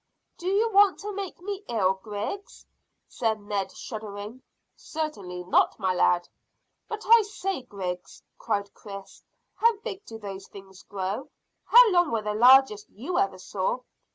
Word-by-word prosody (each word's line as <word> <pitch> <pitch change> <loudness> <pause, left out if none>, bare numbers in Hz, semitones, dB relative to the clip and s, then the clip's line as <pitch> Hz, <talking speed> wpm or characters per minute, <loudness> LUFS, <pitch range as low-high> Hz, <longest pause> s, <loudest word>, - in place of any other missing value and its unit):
"Do 350 - -5
you 425 +4 +2
want 400 -1 +5
to 415 0 -5
make 390 -2 -5
me 400 +1 -5
ill, 195 -5 +2
Griggs?" 210 - -6 0.4
said 220 -2 -1
Ned, 205 -2 -3
shuddering. 215 +1 -7 0.3
"Certainly 200 - -5
not, 180 - +3
my 190 -3 0
lad." 175 -1 +2 0.6
"But 435 -1 -5
I 460 +1 +8
say, 390 -5 -3
Griggs," 180 -6 -6 0.2
cried 200 -3 -2
Chris, 195 -2 -10 0.3
"how 460 -1 +3
big 415 -4 -6
do 225 - -8
those 195 -2 -8
things 195 -1 -13
grow 195 +5 -4 0.4
how - - +8
long 350 -3 +4
were 225 -2 -1
the 210 0 -1
largest 245 -1 +6
you 320 - -3
ever 195 -1 +1
saw?" 190 +6 -2
220 Hz, 150 wpm, -27 LUFS, -, 0.6 s, I